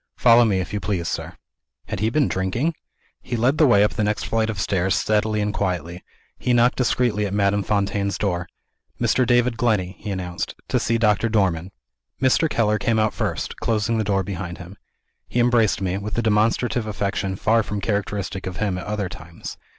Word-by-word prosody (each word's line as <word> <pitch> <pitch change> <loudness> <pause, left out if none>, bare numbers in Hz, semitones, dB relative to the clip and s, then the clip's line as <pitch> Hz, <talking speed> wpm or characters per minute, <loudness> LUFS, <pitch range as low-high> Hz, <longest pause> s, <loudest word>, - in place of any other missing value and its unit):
Follow 120 0 +6
me, 100 -4 +1
if 90 +1 -4
you 105 - -1
please, 95 -5 -2
sir." - - -4 0.5
Had - - -4
he 110 +3 +1
been 145 +2 +2
drinking? 105 - -1 0.5
He 120 - -4
led 125 +6 +2
the 155 - +6
way 100 -5 +5
up 105 - +1
the 110 - -1
next 105 -2 0
flight 115 0 0
of 105 -4 -3
stairs, 95 0 +1
steadily 105 0 +1
and 105 0 -1
quietly. 90 -3 -3 0.4
He 125 - +1
knocked 120 +1 +3
discreetly 120 -4 +1
at 100 - -4
Madame 100 0 +2
Fontaine's 100 -1 0
door. 90 -3 -1 0.5
"Mr. 130 -2 +2
David 120 -1 +3
Glenney," 105 -6 0
he 105 - -6
announced, 90 -2 -4
"to - - +2
see 115 - +1
Doctor 110 0 +2
Dormann." 95 -5 +1 0.5
Mr. 135 +4 +3
Keller 105 -4 +1
came 115 -1 +1
out 110 0 +2
first, - - -3
closing 110 0 0
the - - +1
door 100 -2 +1
behind 90 -2 -5
him. 90 +2 -10 0.5
He 125 - -1
embraced 120 -4 +3
me, 95 +1 -1
with 105 +2 -5
a 120 - +1
demonstrative 110 +2 +1
affection 100 -2 -2
far 115 +4 +2
from 105 -1 -4
characteristic 100 -2 -2
of 90 - -5
him 100 -4 -1
at - - -8
other 105 -2 -2
times. 85 -1 -9
105 Hz, 195 wpm, -22 LUFS, 95-115 Hz, 0.5 s, Follow